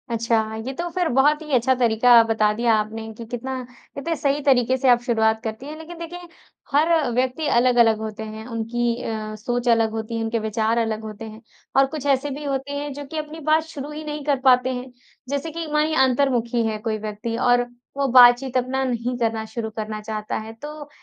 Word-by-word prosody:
अच्छा, 225 -1 0
ये 265 - -3
तो 345 +5 -4
फिर 355 0 0
बहुत 295 +3 +4
ही 305 -1 -8
अच्छा 255 +1 +4
तरीका 240 0 +5
बता 215 -1 +3
दिया 230 +1 +2
आपने 220 +1 -3
कि 230 +1 -9
कितना 255 +3 -5 0.3
कितने 325 +4 -2
सही 285 -1 0
तरीके 260 -2 +3
से 260 0 +2
आप 240 -1 +6
शुरुआत 220 -2 +1
करती 220 +3 -5
हैं। 305 +2 -7
लेकिन 325 +2 -10
देखिए, 340 +1 -7 0.5
हर 310 -2 +3
व्यक्ति 255 +5 0
अलग-अलग 240 -2 +4
होते 220 0 -5
है, 220 0 -8
उनकी 235 0 -1
अ, 215 -2 -4
सोच 245 +3 -3
अलग 225 -1 +3
होती 225 +1 -4
है, 225 - -2
उनके 225 +1 -1
विचार 220 +1 0
अलग 225 -2 -1
होते 215 +1 -7
हैं, 220 0 -10 0.3
और 270 0 +6
कुछ 290 -3 -5
ऐसे 275 0 +1
भी 285 +2 -6
होते 275 0 -3
हैं, 285 0 -4
जो 285 +1 -7
कि 315 +3 -7
अपनी 305 +1 -5
बात 315 +1 +4
शुरू 295 -2 -8
ही 305 +1 -6
नहीं 300 -1 -5
कर 285 -3 +1
पाते 255 0 +5
हैं। 250 +1 -6 0.4
जैसे 285 +3 -2
कि 335 +1 -5
मानिए 305 +1 +2
अंतर्मुखी 245 -3 +1
हैं 215 -1 -3
कोई 220 -1 -2
व्यक्ति, 215 +2 -5
और 245 0 +3 0.3
वो 280 -1 +1
बातचीत 250 +1 +6
अपना 255 +1 0
नहीं 245 -1 -2
करना 225 -2 -1
शुरू 220 0 -5
करना 215 0 -4
चाहता 215 0 -4
है, 220 +1 -7
तो 295 +5 -9
245 Hz, 210 wpm, -22 LUFS, 225-280 Hz, 0.5 s, आप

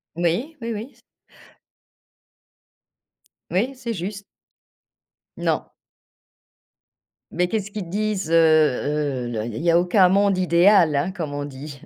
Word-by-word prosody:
Oui, 175 - -1
oui, 230 0 -3
oui 220 +5 -6
c - - -26 2.5
oui, 235 +9 0
c'est 235 -3 -5
juste. 200 +2 -6 1.1
Non. - - -1 1.6
Mais 180 0 0
qu'est-ce 205 +1 -3
qu'ils 210 -1 -5
te 170 - -12
disent? 200 -3 -2
Heu, - - +1
heu, 150 -4 +2
l 120 - -5
il 120 - -5
y - - -7
a - - -5
il - - -6
y 170 - +3
a 170 - +5
aucun 180 +1 +4
monde 200 0 +2
idéal, 175 -2 +4
hein, 145 +7 0
comme 165 -7 -5
on 145 0 -4
dit. 140 0 -9
175 Hz, 145 wpm, -22 LUFS, 155-205 Hz, 2.5 s, a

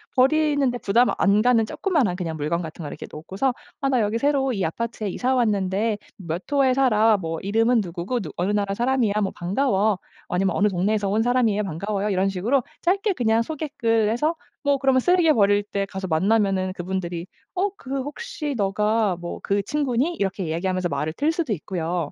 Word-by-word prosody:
버리는데 280 -2 +3
부담 235 +4 +3
안 205 +2 +4
가는 245 -2 +4
조그마한 295 - 0
그냥 170 -3 -4
물건 155 +3 -1
같은 160 +1 -8
걸 145 - -6
놓고서 190 - -2 0.3
"아 275 - +1
나 255 -3 +2
여기 210 +2 0
새로 270 0 +1
이 195 -4 -1
아파트에 220 +5 -3
이사 255 +7 0
왔는데 210 -1 +1 0.2
몇 170 -2 -4
호에 275 -3 +4
살아. 225 -5 +4
뭐 165 -3 -4
이름은 225 +4 +2
누구고 185 +6 -3
누 175 - -6
어느 180 +3 0
나라 200 -1 0
사람이야. 240 -1 +1
뭐 195 - 0
반가워." 200 0 +1 0.3
아니면 185 +1 0
"어느 205 - +3
동네에서 200 +2 0
온 210 +3 +2
사람이에요. 230 -3 +2
반가워요." 200 +3 -2
이런 195 0 +1
식으로 225 +8 +1 0.2
짧게 390 +4 +1
그냥 230 -6 +2
소개글 235 -8 0
해서 300 +9 0 0.3
뭐 285 -1 +2
그러면 265 -1 +3
쓰레기 350 +2 +4
버릴 205 -5 +4
때 200 -1 -3
가서 190 0 -6
만나면은 190 +2 +1
그분들이 175 -1 -4 0.3
"어 380 +2 +1
그 270 -3 -4
혹시 300 - -5
너가 210 0 +1
뭐 175 0 -6
그 200 0 +1
친구니?" 285 - 0
이렇게 195 - -2
이야기하면서 180 +2 -1
말을 150 +2 -2
틀 295 - +1
수도 325 -8 -1
있고요. 170 -2 -3
210 Hz, 395 characters per minute, -23 LUFS, 190-260 Hz, 0.3 s, 안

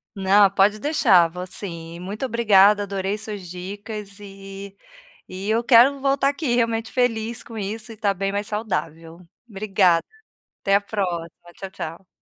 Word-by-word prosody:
Não, 195 +1 +5
pode 200 +2 +3
deixar, 215 - +4
vou 180 +2 -7
sim, 170 -3 -7
muito 200 +7 -6
obrigada 210 -4 +4
adorei 195 0 -3
suas 205 -5 -7
dicas 200 +3 -8
e 195 0 -10 0.5
e 190 +2 -7
e - - -1
eu 230 +2 +1
quero 255 +4 +6
voltar 275 0 +2
aqui 285 -3 -2
realmente 230 -1 0
feliz 230 -2 -1
com 225 -1 -10
isso 215 +3 -5
e 225 - -9
estar 205 -2 0
bem 195 +1 -2
mais 205 +1 -2
saudável. 170 -6 -4 0.3
Obrigada, 195 -4 +2 0.6
até 195 - +1
a 200 - +3
próxima, 185 -5 -3 0.3
tchau, 195 - -8
tchau. 180 -1 -8
200 Hz, 155 wpm, -22 LUFS, 190-220 Hz, 0.6 s, quero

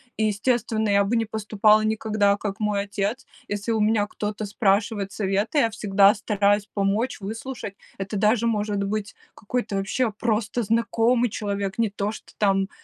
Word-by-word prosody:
И 220 - 0
естественно, 220 0 0
я 200 0 +4
бы 220 +4 0
не 225 - +1
поступала 215 0 +3
никогда, 215 -2 +1
как 200 -1 -4
мой 210 -1 0
отец. 200 +5 -3 0.2
Если 205 +3 -2
у 220 - +1
меня 210 -1 +2
кто-то 210 0 -4
спрашивает 200 0 0
совета, 200 +7 0
я 230 - +3
всегда 205 -2 +4
стараюсь 205 -1 +1
помочь, 205 +5 0
выслушать. 220 +1 -6 0.2
Это 195 +2 -5
даже 220 +3 +2
может 210 -2 -1
быть 205 +1 -3 0.2
какой-то 245 +3 -3
вообще 215 +4 0
просто 220 +1 -1
знакомый 230 +2 +2
человек, 200 -2 -3
не 230 -2 +2
то 205 +1 -2
что - - -11
там, 195 -1 +2
210 Hz, 160 wpm, -24 LUFS, 200-225 Hz, 0.2 s, я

